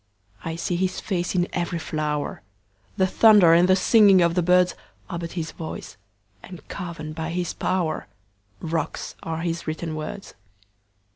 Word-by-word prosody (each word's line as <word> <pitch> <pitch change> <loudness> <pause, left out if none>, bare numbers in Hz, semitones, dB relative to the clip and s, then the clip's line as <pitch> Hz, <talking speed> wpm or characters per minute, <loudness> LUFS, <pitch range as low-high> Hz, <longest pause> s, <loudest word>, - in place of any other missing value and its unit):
I 165 0 -4
see 170 +1 -2
his 185 0 -1
face 180 -2 -2
in 175 0 +2
every 175 -1 -1
flower; 150 -2 -3 0.6
The 190 - +4
thunder 200 -3 +6
and 175 +2 +5
the 185 - +6
singing 195 -1 +6
of 170 0 +2
the 180 - +2
birdsAre 180 +1 +3 0.4
but 170 -1 -6
his 165 -2 -4
voice—and 105 - -11
carven 165 -4 -6
by 160 +1 -4
his 175 0 -2
powerRocks 105 - -4
are 165 0 -4
his 170 -1 -3
written 155 +1 -3
words. 155 +6 -6
170 Hz, 140 wpm, -24 LUFS, 155-180 Hz, 0.6 s, thunder